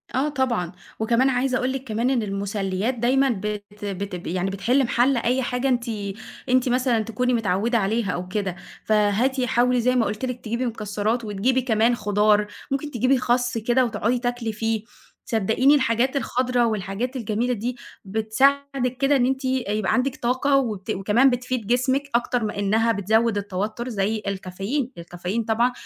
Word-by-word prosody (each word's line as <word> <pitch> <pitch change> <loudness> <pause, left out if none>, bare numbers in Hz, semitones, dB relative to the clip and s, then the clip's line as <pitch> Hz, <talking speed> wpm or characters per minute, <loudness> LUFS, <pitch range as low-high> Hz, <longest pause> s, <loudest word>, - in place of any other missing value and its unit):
آه 275 +4 +1
طبعًا، 250 - -1 0.3
وكمان 235 +4 +3
عايزة 255 0 +1
أقول 255 +1 0
لِك 270 -1 -4
كمان 230 0 -1
إن 255 -4 +1
المسليّات 200 +2 -2
دايمًا 260 +3 +2
بت 205 -1 -4
بت 195 -2 -5
يعني 185 +2 -1
بتحل 230 +8 +1
محل 245 +2 +2
أي 250 +3 +1
حاجة 250 +2 -1
أنتِ 245 -2 +1 0.6
أنتِ 255 0 +3
مثلًا 245 -2 +2
تكوني 250 +3 -1
متعودة 225 +1 +1
عليها 215 -1 0
أو 180 +1 -4
كده، 190 -1 -2 0.3
فهاتِ 215 +5 +2
حاولي 250 0 +2
زي 250 +2 +2
ما 240 -3 +3
قُلت 210 +5 -3
لِك 250 -1 -5
تجيبي 235 +3 -1
مكسّرات 220 0 -2
وتجيبي 225 +6 +1
كمان 235 -1 +2
خضار، 210 -1 +2 0.2
ممكن 275 +2 -2
تجيبي 255 +2 +2
خَسّ 245 -1 0
كده 240 +3 +2
وتقعدي 230 +2 0
تاكلي 245 -2 -2
فيه، 225 0 -1 0.4
صدّقيني 225 +6 +3
الحاجات 260 0 +1
الخضرا 250 -2 +1
والحاجات 215 +4 -2
الجميلة 235 +1 -1
دي 240 +2 -3 0.3
بتساعدِك 255 +5 +1
كده 275 +1 +3
إن 250 -3 +3
أنتِ 265 +1 -1
يبقى 215 -6 0
عندِك 260 +1 +1
طاقة، 260 +3 +1
وبت 215 -8 -2
وكمان 210 +8 +3
بتفيد 245 -3 -2
جسمِك 260 +3 +2
أكتر 240 -1 +1
ما 210 -1 -3
إنّها 220 +3 +2
بتزود 220 +1 +1
التوتّر 205 +5 -3
زي 215 0 -1
الكافيين، 200 +7 -3
الكافيين 180 +6 -4
طبعًا 230 +3 +2
235 Hz, 160 wpm, -23 LUFS, 210-255 Hz, 0.6 s, وكمان